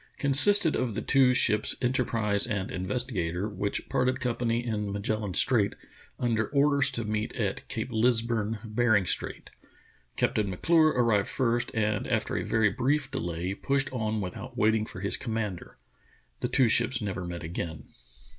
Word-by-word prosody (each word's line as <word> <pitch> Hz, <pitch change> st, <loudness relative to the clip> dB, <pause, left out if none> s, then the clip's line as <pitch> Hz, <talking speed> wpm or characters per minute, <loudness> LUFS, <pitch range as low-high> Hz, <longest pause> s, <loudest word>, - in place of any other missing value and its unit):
consisted 155 Hz, +5 st, +5 dB
of 120 Hz, -5 st, -2 dB
the -, -, -2 dB
two 135 Hz, -2 st, +4 dB
ships 105 Hz, -4 st, +2 dB
Enterprise 115 Hz, -5 st, +1 dB
and 100 Hz, -5 st, -3 dB
Investigatory 95 Hz, -2 st, -1 dB
which 100 Hz, +1 st, -3 dB
parted 130 Hz, +1 st, 0 dB
company 120 Hz, -2 st, -2 dB
in 105 Hz, -3 st, -3 dB
Magellan 100 Hz, -1 st, -3 dB
Strait 110 Hz, -6 st, +3 dB, 0.4 s
under 115 Hz, -3 st, 0 dB
orders 140 Hz, -1 st, +2 dB
to 120 Hz, -3 st, -2 dB
meet 105 Hz, 0 st, -3 dB
at -, -, -3 dB
Cape -, -, -4 dB
Lisburne, 115 Hz, -1 st, +1 dB
Bering 110 Hz, -2 st, +1 dB
Strait. -, -, -3 dB, 0.7 s
Captain 105 Hz, -2 st, 0 dB
M'Clure 160 Hz, -, +3 dB
arrived 115 Hz, -5 st, +2 dB
first, 120 Hz, -2 st, -1 dB
and 105 Hz, -2 st, -1 dB
after -, -, -1 dB
a -, -, -1 dB
very 110 Hz, -2 st, +1 dB
brief 135 Hz, +5 st, -1 dB
delay 90 Hz, -6 st, -3 dB
pushed 135 Hz, +5 st, -2 dB
on 110 Hz, -3 st, -2 dB
without 90 Hz, -2 st, -7 dB
waiting 110 Hz, 0 st, +1 dB
for 90 Hz, -, -9 dB
his 100 Hz, -, +4 dB
com 115 Hz, -4 st, -5 dB
mander. 105 Hz, -6 st, -5 dB, 0.6 s
The -, -, -1 dB
two 130 Hz, -3 st, +3 dB
ships 120 Hz, +3 st, +4 dB
never 95 Hz, -4 st, -4 dB
met 85 Hz, -1 st, -6 dB
again. 80 Hz, -1 st, -6 dB
110 Hz, 155 wpm, -27 LUFS, 100-125 Hz, 0.7 s, consisted